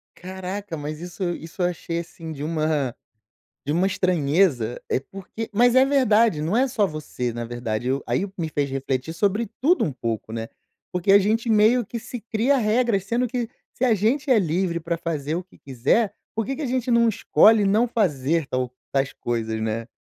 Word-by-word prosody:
Caraca! 190 0 -6
Mas 150 +1 -5
isso 175 0 -3
isso 165 +3 -8
eu 175 - +3
achei 170 -1 -3
assim, 165 -1 -8
de 145 -1 -6
uma 155 -5 0 0.7
de 145 - -1
uma 180 +4 +2
estranheza 160 - +1
é - - +2
porque 195 +8 -8
mas 245 +3 +4
é 260 +1 +7
verdade. 230 - +3
Não 170 +8 0
é 265 +2 +3
só 220 -5 +1
você 150 -7 -4
na 120 0 -4
verdade 120 0 -3
eu 135 +2 0
aí 195 - 0
o - - -9
que 190 - -18
me 160 - -2
fez 145 -2 -1
refletir 135 +3 -2
sobre 205 +5 0
tudo 345 +7 +3
um 150 - -2
pouco, 115 -2 -4
né? 115 0 -4 0.4
Porque 180 +2 +1
a 200 - +8
gente 225 +4 0
meio 220 +2 +4
que 235 +3 -5
se 240 +1 -7
cria 235 +5 +1
regras, 220 -3 +2
sendo 240 +4 0
que 240 -1 -3 0.2
se 260 - -4
a 240 -3 +5
gente 260 +8 0
é 250 - +6
livre 170 -1 0
pra 170 +1 -2
fazer 155 -2 -3
o 180 - -3
que 185 - -22
quiser, 140 - +1 0.2
por 225 -1 -1
que 270 - -3
que 310 - -6
a - - -1
gente 250 0 -1
não 235 0 +5
escolhe 220 0 +4
não 215 +5 +3
fazer 165 - +1
tal 130 -1 -2 0.2
tais 135 -1 +1
coisas, 110 -2 -2
né? 110 +1 -2
180 Hz, 205 wpm, -23 LUFS, 145-225 Hz, 0.7 s, a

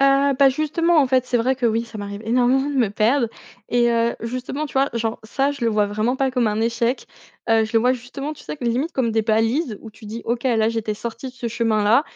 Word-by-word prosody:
Heu, 275 0 +4
bah, 275 -1 +7
justement 310 +4 +1
en 285 - +5
fait, 255 -1 +2
c'est 250 - +1
vrai 245 +3 +1
que 250 -2 0
oui, 230 +1 +1
ça 230 -2 -10
m'arrive 200 +1 -6
énormément 250 +4 +2
de 290 - -3
me 245 -5 +2
perdre 230 +4 +2 0.4
et 240 0 +3
heu, 235 0 +1
justement 255 +5 -4
tu - - -13
vois, 270 +1 +3
genre 225 -1 -2
ça 270 +5 0
je 280 -4 -5
le 230 - +2
vois 210 -1 +2
vraiment 215 +5 -1
pas 270 0 +1
comme 250 -2 +1
un 210 +1 -1
échec. 230 +2 0 0.4
Heu, 225 -1 +4
je 220 - -8
le - - +6
vois 250 +3 +3
justement 260 +4 -6
tu 300 - -13
sais - - -6
que 260 - -7
limites 250 +7 0
comme 235 -4 0
des 220 - +2
balises 225 +3 0
où 225 - -10
tu 225 +1 -16
dis: 225 +3 -6
«OK, 235 +1 -2
là 225 -4 +2
j'étais 225 -2 -2
sorti 235 +4 -6
de - - -11
ce 250 -1 -6
chemin-là, 225 +1 +2
235 Hz, 255 wpm, -21 LUFS, 225-265 Hz, 0.4 s, bah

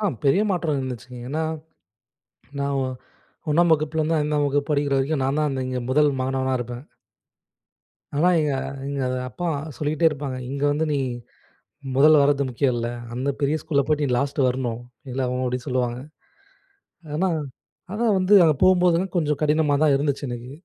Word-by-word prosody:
ஆ 210 - +1 0.2
பெரிய 140 +9 +4
மாற்றம் 170 -5 0
இருந்துச்சுங்க. 125 -1 -6
ஏன்னா, 155 +4 -1 1.2
நான் 140 0 -1
ஒ 135 - 0 0.7
1ஆம் 165 +2 +4
வகுப்புல 155 +1 +1
இருந்து 160 +1 +1
5ஆம் 150 0 +1
வகுப்பு 140 0 0
படிக்கிற 145 -1 +1
வரைக்கும் 135 +1 0
நான் 135 +3 0
தான் 140 -3 0
இங்க 130 0 -3
முதல் 150 +2 +4
மாணவனா 130 0 -1
இருப்பேன். 120 +2 -6 1.3
ஆனா, 170 +5 +4
எங்க 150 - 0 0.4
எங்க 140 0 -3
அத 130 - -1
அப்பா 175 +9 -5 0.3
சொல்லிகிட்டே 155 +3 +1
இருப்பாங்க. 140 -3 -5
"இங்க 140 +1 -4
வந்து 155 +2 0
நீ 145 - +1 1.0
முதல்ல 150 +1 +6
வரது 140 0 +3
முக்கியம் 125 +1 0
இல்ல. 120 0 -2 0.3
அந்த 130 +3 -2
பெரிய 145 +2 +1
ஸ்கூல்ல 140 -3 +1
போயிட்டு 150 -1 +1
நீ 125 - -1
லாஸ்ட்டு 140 -1 +1
வரணும்." 125 -2 -1 0.3
இல்ல 130 +2 -3
அவுங்க 125 +1 -2
அப்பிடி 125 0 -1
சொல்லுவாங்க. 125 -2 -1 1.2
ஆனா 185 +5 +1 0.6
அதான் 220 0 +1
வந்து 190 +2 +3
அங்க 155 -2 +4
போகும்போதுலாம் 180 0 +3
கொஞ்சம் 150 -4 +1
கடினமா 150 -1 +2
தான் 155 -2 +5
இருந்துச்சு 145 0 -1
எனக்கு. 120 +1 -6
145 Hz, 160 wpm, -23 LUFS, 130-155 Hz, 1.3 s, முதல்ல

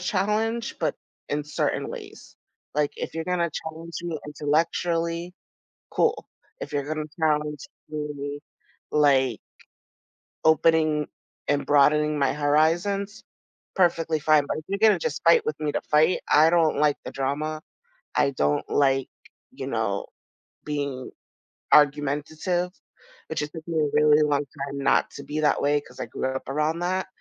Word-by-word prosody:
challenge, 215 +6 -1
but - - 0 0.3
in 145 0 -2
certain 150 - -1
ways. - - -10 0.4
Like, 150 -1 +1
if - - -5
you're 165 - -3
gonna 175 -1 0
challenge 160 +2 -7
me 170 -3 -3
intellectually, 165 +3 -1 0.6
cool. 460 0 +1 0.3
If - - -6
you're 145 -1 -1
gonna 155 0 -3 0.2
challenge 150 - 0 0.2
me, 145 -1 -5 0.5
like, 135 -5 +3 1.0
opening 155 -1 +3 0.4
and 145 0 +1
broadening 150 +1 +3
my 135 -2 +2
horizons, 165 +8 +1 0.5
perfectly 165 -4 +2
fine, 150 -1 +4
but - - -2
if 155 - -8
you're 200 +1 -2
gonna 220 0 +5
just 475 - -3
fight 460 -2 +5
with 455 - -2
me 150 -1 -1
to - - -1
fight, 155 +4 +3
I 155 +2 +6
don't 165 -3 +3
like 150 0 +3
the - - -5
drama. 150 +3 -2 0.5
I 140 - +3
don't 75 - 0
like, 135 -2 +2 0.4
you - - -7
know, - - -1 0.6
being 140 -3 -3 0.6
argumentative, 150 +5 +2 0.6
which 160 - -3
just 150 0 -3
took 160 -1 -9
me 165 -2 -1
a 150 -1 +2
really 150 0 +5
long 145 -1 +2
time 140 0 -7
not 140 - +2
to - - -9
be 155 +1 -3
that 150 - +2
way 145 0 +2
'cause - - -16
I - - -2
grew - - -3
up 130 0 -5
around 155 +4 0
that. 185 +2 -1
150 Hz, 150 wpm, -25 LUFS, 145-170 Hz, 1.0 s, I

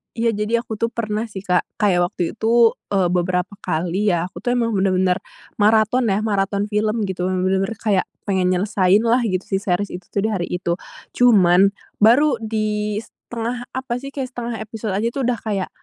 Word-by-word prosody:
Iya, 230 0 +1
jadi 220 +2 0
aku 220 -3 -6
tuh, 230 - +1
pernah 215 0 -2
sih, 195 -3 -8
Kak. 180 -2 +1
Kayak 180 -5 +2
waktu 180 - -5 0.2
itu, 230 +1 +4 0.2
eee, 190 -3 +1
beberapa 180 0 0
kali 180 +6 -1
ya, 175 +2 -2
aku - - -10
tuh, 245 +6 -1
emang 230 -2 +1
bener-bener 190 -2 +2 0.4
maraton 220 +3 +3
ya, 200 +1 +1
maraton 200 -1 0
film, 215 +1 0
gitu. 185 -2 -2
Emang 185 -1 -1
bener-bener 190 +3 0
kayak 200 -4 +1 0.2
pengen 190 -3 0
nyelesainlah 205 +5 +3
gitu 185 -2 -1
si 195 - -1
series 195 0 -1
itu 180 0 -8
tuh 200 - -1
di 220 - 0
hari 185 -4 -1
itu. 175 0 -2 0.4
Cuman, 195 -5 +5 0.2
baru 260 +7 +5
di, 215 -1 -2
1/2 240 +2 -6
apa 260 -2 -3
sih, 275 +2 -9
kayak 270 -3 -3
1/2 240 -1 -5
episod 220 -2 -5
aja 210 +4 0
tuh, 260 0 -2
udah 245 -2 0
kayak, 200 -4 -2
210 Hz, 185 wpm, -21 LUFS, 185-230 Hz, 0.4 s, Cuman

